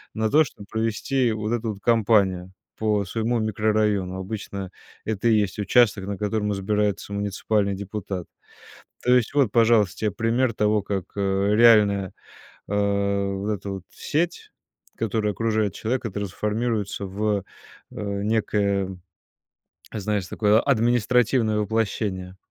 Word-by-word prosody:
на 110 -1 0
то, 155 +2 +6
чтоб 115 -7 -10
провести 115 +3 0
вот 110 0 -3
эту 115 -2 -1
вот 100 - -13
компанию 100 -6 +2 0.3
по 105 -2 +1
своему 115 +4 -1
микрорайону. 105 -3 0
Обычно 100 -1 -5 0.4
это 110 +1 0
и 110 - +5
есть 100 0 -2
участок, 105 -1 +3
на 100 -1 -3
котором 105 0 -1
избирается 105 0 -1
муниципальный 100 0 0
депутат. 100 -2 -5 0.8
То 125 - +4
есть 120 -3 +1
вот, 140 -6 +3
пожалуйста, 115 -4 +3
тебе 105 -1 -1
пример 115 +4 +1
того, 105 -1 +1
как, 100 -2 -3
э, 100 0 +1
реальная, 105 -4 +5 0.6
э, - - -4
вот 100 0 0
эта 100 -1 -4
вот 95 -2 -5
сеть, 170 +3 -2 0.5
которая 110 -1 -1
окружает 110 -3 0
человека, 115 +1 -2
трансформируется 105 +1 -2
в, 100 +1 -1 0.5
э, - - -15 0.3
некое, 100 -3 0 0.9
знаешь, 105 -3 -2
такое 105 +3 +3
административное 120 -2 +2
воплощение. 100 -3 -2
105 Hz, 125 wpm, -24 LUFS, 100-115 Hz, 0.9 s, то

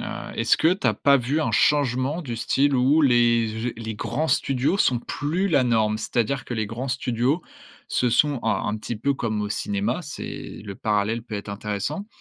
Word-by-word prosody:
Heu, - - -4 0.3
est-ce - - +3
que 165 +3 +3
tu 185 -9 -2
as 110 - +3
pas 140 +5 +4
vu 135 +6 -1
un 115 - 0
changement 130 +5 +2
du 120 -5 -5
style 140 +4 +1
où 135 +5 +4
les 120 -2 +2
les 110 -1 -5
grands 155 +8 -2
studios 135 +8 +1
sont 125 -10 +3
plus 165 +10 -2
la 140 -6 +3
norme? 110 -3 +1
C'est-à-dire 120 +4 -1
que 120 - -4
les 110 -1 -1
grands 120 +5 -5
studios 125 +4 0 0.4
se 125 - +1
sont 145 +3 +2
alors, 110 - 0
un 105 - -1
petit 115 +1 -5
peu 140 +6 0
comme 110 -5 -2
au 105 - -2
cinéma, 205 - -1
c'est 150 - -7
le 100 -2 -6
parallèle 105 +3 0
peut 115 -3 -8
être 100 0 -6
intéressant. 105 - -4
120 Hz, 195 wpm, -24 LUFS, 110-140 Hz, 0.4 s, pas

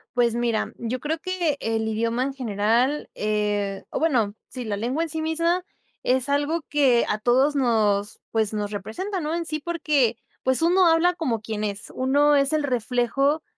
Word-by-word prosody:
Pues 240 -2 +3
mira, 235 -2 -1
yo 235 +2 -3
creo 305 +4 -2
que 350 -5 -1
el 225 0 -1
idioma 230 +3 0
en 275 +1 -2
general, 240 +3 0
eh, 205 -2 -1
o - - -2
bueno, 245 -11 +1
sí, 250 -2 -7
la 210 -2 -2
lengua 250 +10 -1
en 330 - -4
sí 315 +1 -3
misma, 335 +3 0 0.4
es 255 +1 +1
algo 290 +4 +1
que 265 -5 +3
a 210 - -1
todos 260 +6 +3
nos 215 -5 +1
pues, 220 -1 +1
nos 210 -1 -2
representa, 225 - -4
¿no?, 310 +1 -2
en 340 -1 -2
sí, 310 -1 -3
porque 295 -7 +1 0.3
pues, 260 +3 +1
uno 360 +2 +5
habla 330 +2 +4
como 270 -11 -2
quien 215 -1 -4
es. 205 0 -4
Uno 285 +3 +3
es 275 0 +3
el 305 -1 +1
reflejo 255 +3 0
255 Hz, 180 wpm, -24 LUFS, 220-310 Hz, 0.4 s, uno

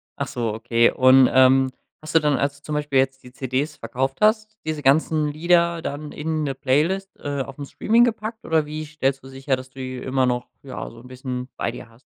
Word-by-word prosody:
Ach - - -3
so, 115 -3 -2
okay. 115 +1 +2
Und, 130 0 +6
ähm, 130 0 +5 0.3
hast 155 +1 -8
du - - +8
dann, 150 -3 +1
als 140 +2 -1
du - - -44
zum 150 - -4
Beispiel 145 -2 +1
jetzt 130 0 0
die 125 - -14
CDs 130 +4 -2
verkauft 130 +3 -3
hast, 215 0 +2
diese 155 -1 -3
ganzen 150 +2 +3
Lieder 170 +2 +2
dann 150 0 -5
in 155 0 -2
'ne 135 -2 -2
Playlist, 165 +10 +1
äh, 145 -1 -3
aufm 135 +2 -7
Streaming 230 +10 +3
gepackt? 225 -1 -2
Oder 160 -2 +2
wie 155 +1 -5
stellst 140 -3 -2
du - - -11
sicher, 135 +1 -1
dass 130 0 -10
du 135 - -14
die 130 0 -5
immer 130 +1 0
noch, 125 -1 -1 0.2
ja, 135 - -6
so 115 - -14
'n 125 - -14
bisschen 125 0 -6
bei - - -1
dir 115 - -10
hast? 115 +2 -22
135 Hz, 220 wpm, -23 LUFS, 130-155 Hz, 0.3 s, du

